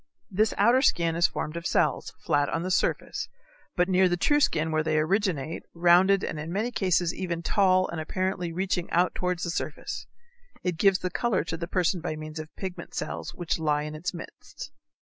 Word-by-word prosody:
This 210 +3 +2
outer 235 +6 +5
skin 170 - +2
is 170 +1 +4
formed 155 - -5
of 170 0 -3
cells, - - 0
flat 145 -3 +1
on 165 - -2
the 185 - -2
surface, - - -1 0.5
but 180 -1 +2
near 185 -1 +4
the 175 - 0
true 290 - +3
skin 160 - +1
where 155 0 +2
they 155 0 0
originate, 165 -2 0
rounded 180 +3 +5
and 155 - -3
in 160 +2 -5
many 215 +6 -1
cases 180 -5 +1
even 170 -2 -3
tall 185 -1 +3
and 165 -2 -4
apparently 185 +1 -2
reaching 180 0 -2
out 175 +2 +2
towards 180 -1 -2
the 170 - -1
surface. - - -4 0.6
It 180 -3 -2
gives 195 0 +5
the 180 0 -4
color 235 -6 0
to 165 - -4
the 170 +1 -5
person 180 -1 0
by 155 -2 -3
means 155 0 -7
of 155 0 -7
pigment 190 -2 -7
cells 80 +2 -4
which 175 -1 -2
lie 150 -2 +1
in 150 0 -5
its 165 +5 -3
midst. 170 -2 -10
175 Hz, 200 wpm, -27 LUFS, 160-185 Hz, 0.6 s, outer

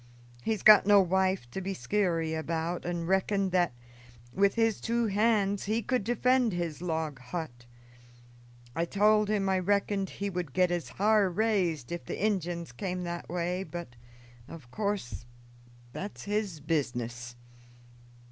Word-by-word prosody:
He's 220 - -2
got 210 -2 +8
no 205 -1 +7
wife 190 -5 +1
to 190 - -4
be 195 +1 -3
skeary 170 -6 0
about, 165 +2 -3
and 170 -1 -3
reckoned 190 +1 +1
that, 175 -3 +2 0.6
with 200 +1 +3
his 225 -2 +1
two 235 0 0
hands, 205 -1 +1
he 220 +3 0
could 255 0 0
defend 245 0 +2
his 170 -3 -3
log 160 -5 -2
hut. 125 -3 -7 1.1
I 165 - +1
told 210 +3 +3
him 205 -2 +1
I 190 -1 +2
reckoned 200 +1 0
he 200 - -4
would 175 -7 -4
get 180 -1 +3
his 175 -1 -2
har 210 -1 +3
raised 180 - 0
if 175 0 -4
the - - -5
Injuns 175 - -1
came 180 +7 -4
that 175 0 -5
way; 175 +2 -1
but, 175 -4 -6 0.6
in 165 - -8
course, 185 - -3 0.7
that's 200 +2 -6
his 205 -6 -2
business." 125 -6 -2
185 Hz, 145 wpm, -29 LUFS, 165-205 Hz, 1.1 s, got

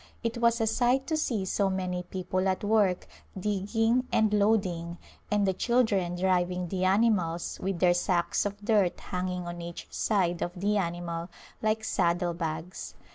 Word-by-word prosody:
It 230 +1 -2
was 235 0 +3
a 225 - +2
sight 245 +4 +2
to 315 - -1
see 230 -10 -1
so 195 +1 +1
many 185 -1 -2
people 185 +1 -2
at 185 - -1
work 205 -4 +2 0.3
digging 225 +5 +1
and 215 -1 +3
loading, 190 -5 +1 0.3
and 210 -1 +2
the 190 - +2
children 200 -5 +1
driving 180 -1 0
the 185 0 -1
animals 185 -4 +1
with 190 -1 -1
their 175 0 +4
sacks 175 0 +1
of 205 0 -5
dirt 205 -6 +2
hanging 180 -1 -3
on 175 0 -6
each 170 0 -7
side 180 -5 0
of 175 +1 -3
the 205 +3 +1
animal 170 -2 -3 0.3
like 220 0 0
saddle 175 -4 +1
bags. 165 +1 -5
190 Hz, 160 wpm, -28 LUFS, 175-215 Hz, 0.3 s, their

